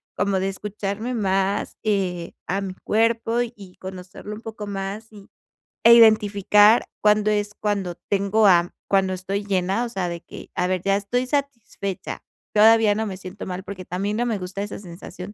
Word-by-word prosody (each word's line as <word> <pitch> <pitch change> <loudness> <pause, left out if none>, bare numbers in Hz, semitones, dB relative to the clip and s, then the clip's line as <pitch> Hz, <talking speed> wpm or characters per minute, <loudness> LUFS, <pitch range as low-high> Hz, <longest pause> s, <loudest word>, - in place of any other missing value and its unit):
como 200 -1 +1
de 190 +1 0
escucharme 205 +4 -4
más, 195 -1 0
eh, 185 -5 -1
a 195 +2 -1
mi 190 -2 -5
cuerpo 230 +1 +1
y 205 -6 -10
conocerlo 190 +2 -8
un 215 - -11
poco 220 -2 -7
más, 200 +3 -5
y 205 -2 -14 0.5
e 235 +1 +9
identificar 210 -1 +6 0.2
cuándo 210 0 +3
es 210 0 -1
cuando 200 -5 -2
tengo 200 +2 +2
ha 175 -2 +4 0.2
cuando 190 -1 +2
estoy 195 +2 -3
llena, 195 +3 0
o - - -5
sea, 190 -5 -2
de 170 0 -5
que: - - -11
"A 180 - +1
ver, 185 -1 -1
ya 195 0 +2
estoy 240 +5 -1
satisfecha". 250 -9 -4 0.3
Todavía 220 0 +6
no 220 +1 -1
me 195 - -5
siento 185 +1 -8
mal, 185 0 -5
porque 185 -1 -8
también 200 +5 -2
no 240 - 0
me 225 -4 -1
gusta 185 +1 -5
esa 205 - -6
sensación 180 +1 -9
200 Hz, 175 wpm, -23 LUFS, 190-215 Hz, 0.5 s, e